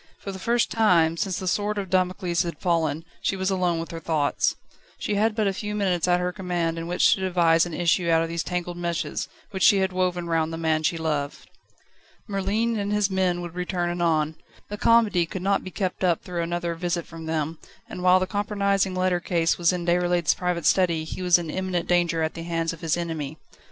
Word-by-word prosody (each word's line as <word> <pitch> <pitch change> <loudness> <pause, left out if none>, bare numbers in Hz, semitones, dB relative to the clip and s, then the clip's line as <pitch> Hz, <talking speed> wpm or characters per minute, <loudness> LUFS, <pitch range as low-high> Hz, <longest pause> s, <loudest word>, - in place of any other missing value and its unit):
For 200 - -7
the 190 - -8
first 235 +5 +1
time, 175 -8 +3
since 190 +1 -2
the 185 - -4
sword 205 +3 0
of 195 -3 -4
Damocles 185 -2 +1
had 170 -4 -3
fallen, 165 -2 0 0.2
she - - 0
was 190 0 -1
alone 180 -3 +1
with 165 +1 -6
her 165 - -5
thoughts. 155 -3 0 0.4
She - - -2
had 210 +1 +1
but 220 -2 +1
a 195 - +1
few 210 +2 -4
moments 185 -4 0
at 180 0 +3
her 180 0 -1
command 175 -3 -2
in 165 - -5
which 175 +1 +4
to - - -2
devise 175 -3 +3
an 170 - -6
issue 175 0 +1
out 165 0 +4
of - - -2
these 165 0 -2
tangled 175 -1 -3
meshes, 170 -1 -2 0.2
which 190 -2 -5
she 200 - +6
had 190 -1 0
woven 180 -1 0
round 165 -1 0
the 165 - -4
man 160 -1 +1
she 160 +2 0
loved. 150 -3 -3 0.8
Merlin 210 +3 0
and 200 0 -2
his 210 -1 +1
men 185 -2 +1
would 175 -1 -7
return 180 -1 -2
anon. 160 -3 0 0.3
The 205 - -5
comedy 215 -7 +4
could 185 +2 -6
not 195 0 +1
be 185 - -6
kept 185 0 -3
up 175 -3 +2
through 175 -2 -3
another 170 0 -2
visit 170 0 -2
from 165 0 -9
them, 160 0 -2 0.3
and 180 - -7
while 185 0 +5
the 185 - 0
compromising 200 -1 0
letter 185 -1 +1
case 170 -2 0
remained 175 0 +1
in 175 +1 +3
Déroulède's 175 -2 +2
private 180 -2 -2
study 170 -4 +3
he 160 - -6
was 180 -1 +5
in 165 -3 -5
imminent 185 -1 -2
danger 170 -2 +2
at 160 - -1
the 165 - -7
hands 165 -1 -2
of 165 - -12
his 165 0 0
enemy. 160 -3 -4
175 Hz, 220 wpm, -25 LUFS, 165-190 Hz, 0.8 s, she